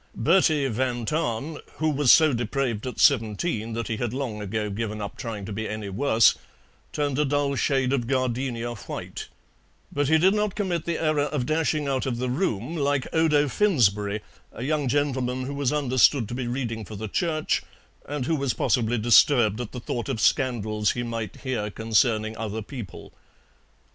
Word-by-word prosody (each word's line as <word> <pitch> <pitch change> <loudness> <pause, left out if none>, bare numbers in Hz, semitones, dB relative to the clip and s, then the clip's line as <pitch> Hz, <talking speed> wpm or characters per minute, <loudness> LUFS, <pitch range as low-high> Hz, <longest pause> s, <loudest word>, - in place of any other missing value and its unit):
Bertie 155 0 +3
van 120 0 -1
Tahn, 150 +1 -2 0.2
who 155 0 0
was 145 -3 +4
so 155 -3 +6
depraved 120 0 -2
at 125 - -6
seventeen 115 - +2
that 115 0 -3
he 110 - -2
had 120 +1 -3
long 120 -6 -3
ago 105 +1 -2
given 105 +1 -3
up 100 -1 -5
trying 110 -5 -5
to 105 - -6
be 110 +2 -4
any 105 -2 -5
worse, 110 +2 +4 0.6
turned 145 -2 -1
a - - +4
dull 145 0 0
shade 135 +1 +1
of 120 -4 -1
gardenia 125 -2 -1
white, 110 - -7 0.6
but 145 -1 0
he 160 +2 +5
did 185 +5 +4
not 210 -2 0
commit 180 -6 -2
the 170 -1 -1
error 155 -2 +1
of 145 -4 -2
dashing 155 0 0
out 135 0 -1
of 120 -3 -2
the 125 +1 -2
room 130 - -1
like 145 -3 0
Odo 150 -3 +3
Finsberry, 105 - +2 0.3
a 115 - -7
young 145 0 0
gentleman 130 -2 0
who 135 +2 -4
was 140 -3 0
understood 130 -4 +3
to 120 - -6
be 125 -1 -3
reading 120 -3 -3
for 105 +1 -9
the 110 +2 -5
Church 155 - 0 0.5
and 145 -3 -2
who 165 - +1
was 135 -6 -1
possibly 120 -2 +1
disturbed 115 -1 +4
at 120 - -6
the 125 - -6
thought 120 +1 -4
of 125 -5 -2
scandals 110 -5 +1
he 120 - -3
might 115 -2 -5
hear 120 -6 -2
concerning 110 0 +1
other 110 0 -4
people. 110 - -9
125 Hz, 180 wpm, -25 LUFS, 110-145 Hz, 0.6 s, so